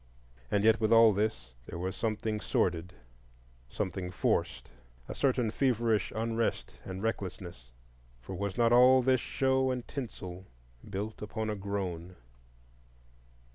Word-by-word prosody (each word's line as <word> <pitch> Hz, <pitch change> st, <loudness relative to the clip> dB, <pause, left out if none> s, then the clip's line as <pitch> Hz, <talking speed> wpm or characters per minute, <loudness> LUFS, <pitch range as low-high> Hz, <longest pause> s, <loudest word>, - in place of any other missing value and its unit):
And 100 Hz, -, +1 dB
yet 110 Hz, +1 st, +4 dB
with 110 Hz, 0 st, +2 dB
all 115 Hz, -1 st, +7 dB
this 100 Hz, -, -2 dB, 0.2 s
there -, -, -6 dB
was 95 Hz, +2 st, -3 dB
something 110 Hz, +1 st, -2 dB
sordid, 90 Hz, +1 st, 0 dB, 0.8 s
something 95 Hz, 0 st, -3 dB
forced,—a -, -, -3 dB
certain 125 Hz, -5 st, +1 dB
feverish 115 Hz, -5 st, +1 dB
unrest 115 Hz, 0 st, -1 dB
and 95 Hz, +1 st, -6 dB
recklessness; 90 Hz, -, -4 dB, 0.5 s
for 65 Hz, +10 st, -9 dB
was 100 Hz, +1 st, -3 dB
not 120 Hz, 0 st, +4 dB
all 125 Hz, +1 st, +7 dB
this 130 Hz, -1 st, +3 dB
show 130 Hz, 0 st, +1 dB
and 125 Hz, -2 st, -3 dB
tinsel 95 Hz, -9 st, -7 dB, 0.4 s
built 105 Hz, +3 st, -5 dB
upon 110 Hz, +1 st, -3 dB
a -, -, -2 dB
groan? 95 Hz, -3 st, -4 dB
105 Hz, 125 wpm, -31 LUFS, 90-115 Hz, 0.8 s, all